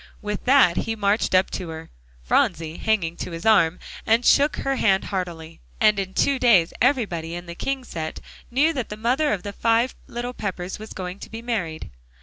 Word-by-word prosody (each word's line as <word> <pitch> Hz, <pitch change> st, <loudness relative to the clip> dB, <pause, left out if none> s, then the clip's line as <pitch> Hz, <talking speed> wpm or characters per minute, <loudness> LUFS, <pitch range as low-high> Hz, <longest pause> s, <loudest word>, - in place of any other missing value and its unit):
With 210 Hz, -1 st, -4 dB
that, 255 Hz, -10 st, +5 dB
he 225 Hz, -, -1 dB
marched 205 Hz, -2 st, +1 dB
up 185 Hz, +1 st, +3 dB
to 180 Hz, -3 st, -5 dB
her, 160 Hz, 0 st, -8 dB, 0.3 s
Phronsie 155 Hz, -, +1 dB
hanging 185 Hz, -7 st, 0 dB
to -, -, -5 dB
his 165 Hz, +2 st, -7 dB
arm, 185 Hz, -6 st, +4 dB, 0.3 s
and 230 Hz, +2 st, +2 dB
shook 290 Hz, +1 st, +4 dB
her 270 Hz, 0 st, -2 dB
hand 195 Hz, -5 st, +3 dB
heartily. 170 Hz, -4 st, -5 dB, 0.2 s
And 210 Hz, -2 st, +4 dB
in 190 Hz, -1 st, -4 dB
two 280 Hz, -2 st, +2 dB
days 195 Hz, -10 st, +4 dB
everybody 200 Hz, -, +1 dB
in 175 Hz, 0 st, -7 dB
the 170 Hz, -, -7 dB
King 270 Hz, +8 st, -3 dB
set 160 Hz, -9 st, -5 dB, 0.3 s
knew 290 Hz, +7 st, +2 dB
that 255 Hz, -6 st, -3 dB
the 210 Hz, -, -6 dB
mother 255 Hz, +7 st, +1 dB
of 195 Hz, -4 st, -2 dB
the 205 Hz, -, -6 dB
five 230 Hz, +4 st, +2 dB
little 240 Hz, +1 st, -5 dB
Peppers 190 Hz, -4 st, -5 dB
was 215 Hz, +1 st, -9 dB
going 185 Hz, +1 st, -6 dB
to -, -, -9 dB
be 225 Hz, +1 st, -8 dB
married. 180 Hz, -, -3 dB
205 Hz, 195 wpm, -23 LUFS, 175-240 Hz, 0.3 s, that